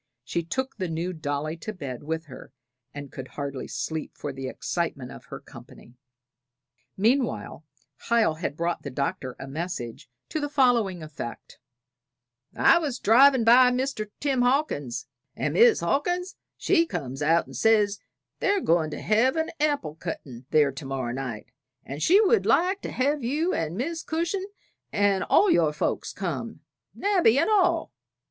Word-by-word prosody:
She 155 +6 -2
took 260 +11 -4
the 185 -3 -2
new 170 +3 -3
dolly 155 0 -3
to 215 - -6
bed 140 - -7
with 160 +2 -4
her, 130 -1 -12 0.4
and 145 -2 -8
could 130 -1 -7
hardly 140 -2 -5
sleep, 160 -1 -4
for 145 - -5
the 135 0 -5
excitement 140 -3 -3
of - - -12
her - - -8
company. 120 - -14 1.0
Meanwhile, 215 - 0 0.5
Hiel 230 -9 +3
had 155 -3 -3
brought 170 +1 -1
the 140 - -6
Doctor 130 -1 -3
a - - -7
message 140 -6 -5 0.2
to 310 - -2
the 290 -1 -2
following 235 - +2
effect: 145 -6 -8 1.0
"I 340 - +5
was 285 -7 -2
drivin' 260 +3 +5
by 250 +2 +7 0.5
Tim 275 -3 +1
Hawkins', 245 - 0 0.3
and - - -2
Mis' 470 0 +5
Hawkins 355 +6 -1 0.2
she 335 0 +2
comes 135 - -5
out 165 +3 +3
and - - -12
says 210 -2 +3 0.4
they're 400 0 +2
goin' 165 - +2
to - - -6
hev 230 +6 +2
an 320 0 -1
apple 290 - 0
cuttin' 135 -7 -7
there 150 -3 +4
to 135 +2 -9
morrow 130 -3 -3
night, 125 -5 -6 0.3
and 140 +3 -7
she 375 - +5
would 445 +2 +3
like 375 +3 +2
to - - -5
hev 280 +2 0
you 305 +9 0
and 165 +2 -2
Mis' 320 +7 -2
Cushin' 340 +5 -2 0.4
and 200 -2 +2
all 400 -2 +4
your 160 -3 +3
folks 150 - -2
come - - -5 0.3
Nabby 365 - +3
and 360 - +2
all." 400 -4 +2
185 Hz, 155 wpm, -26 LUFS, -, 1.0 s, by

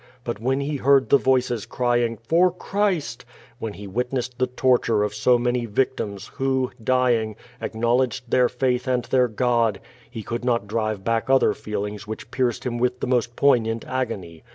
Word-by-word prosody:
But 120 -4 -4
when 130 +4 0
he 145 +1 -2
heard 135 0 +3
the 140 - +6
voices 125 -4 +1
crying 120 -2 0
"For 165 +11 +3
Christ!" 180 - -2 0.2
— 120 +1 -27
^when 110 -2 -4
he 105 - -9
witnessed 125 +4 -3
the 130 - +2
torture 125 -4 +2
of 105 0 -2
so 120 +4 +3
many 120 0 -1
victims, 105 -3 -2
who, 130 -1 0 0.2
(lying, 120 -4 +2 0.3
acknowledged 120 +2 0
their 125 -1 +4
faith 125 0 -1
and 125 -2 0
their 125 -1 +3
God 115 -2 +1 0.2
— 120 0 -27
^he 110 - -6
could 120 +1 -4
not 120 -4 +1
drive 110 -1 -2
back 115 +3 0
other 135 0 +4
feelings 105 0 -5
which 110 - -7
pierced 125 -3 0
him 120 -1 -2
with 125 +1 0
the - - -2
most 120 -2 0
poignant 115 -5 +2
agony. 100 -11 -4
120 Hz, 175 wpm, -23 LUFS, 115-130 Hz, 0.3 s, the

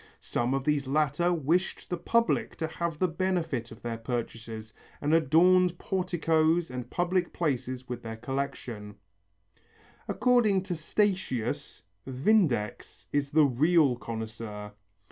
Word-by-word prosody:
Some 120 +3 -1
of 135 - -1
these 145 -2 +1
latter 150 +4 +2
wished 170 +3 0
the 175 - 0
public 230 +6 +1
to 160 - -2
have 165 0 -3
the 185 - +2
benefit 165 -8 -1
of 115 - -12
their 115 -1 -3
purchases, 115 -2 -5 0.3
and 150 +2 0
adorned 175 +3 +4
porticoes 170 -3 +1
and 125 -1 -6
public 180 0 0
places 130 -5 -2
with 125 -1 -5
their 115 -1 -6
collections. 120 -5 -4 1.1
According 220 -7 +3
to 180 -2 -3
Statius, 155 - -1 0.2
Vindex 130 - +1
is 145 -1 +1
the 155 +1 +5
real 145 +1 +3
connoisseur. 110 -3 -6
150 Hz, 125 wpm, -29 LUFS, 120-175 Hz, 1.1 s, the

